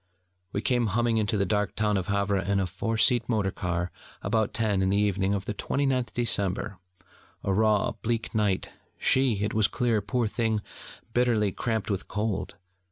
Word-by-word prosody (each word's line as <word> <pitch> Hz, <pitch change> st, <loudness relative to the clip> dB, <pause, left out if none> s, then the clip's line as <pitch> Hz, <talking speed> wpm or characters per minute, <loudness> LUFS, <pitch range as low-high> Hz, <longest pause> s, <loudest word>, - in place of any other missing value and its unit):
We 100 Hz, -, -3 dB
came 120 Hz, -2 st, +2 dB
humming 115 Hz, +3 st, +1 dB
into 105 Hz, 0 st, 0 dB
the 100 Hz, -, +2 dB
dark 105 Hz, +2 st, 0 dB
town 105 Hz, -1 st, +1 dB
of 95 Hz, -2 st, -1 dB
Havre 100 Hz, 0 st, +1 dB
in 100 Hz, +1 st, 0 dB
a 95 Hz, -, +1 dB
four 100 Hz, +5 st, -3 dB
seat 115 Hz, +2 st, +3 dB
motor 105 Hz, -4 st, +1 dB
car 90 Hz, -2 st, -2 dB, 0.3 s
about 110 Hz, +1 st, +1 dB
ten 105 Hz, -4 st, +1 dB
in 95 Hz, -, +2 dB
the 100 Hz, -, +2 dB
evening 100 Hz, -1 st, +1 dB
of 100 Hz, -1 st, -4 dB
the -, -, -2 dB
29th 130 Hz, +2 st, 0 dB
December: 100 Hz, -4 st, 0 dB, 0.6 s
a 95 Hz, -, 0 dB
raw 105 Hz, 0 st, +3 dB
bleak 115 Hz, 0 st, -3 dB
night, 105 Hz, -4 st, +1 dB, 0.3 s
she, 125 Hz, -6 st, +3 dB
it 105 Hz, -, -1 dB
was 110 Hz, -2 st, +3 dB
clear, 115 Hz, -4 st, +1 dB
poor 120 Hz, +4 st, 0 dB
thing, 110 Hz, -1 st, 0 dB, 0.5 s
bitterly 120 Hz, -5 st, +2 dB
cramped 110 Hz, +1 st, -2 dB
with 100 Hz, -1 st, -3 dB
cold. 105 Hz, -2 st, -2 dB
105 Hz, 175 wpm, -27 LUFS, 100-115 Hz, 0.6 s, seat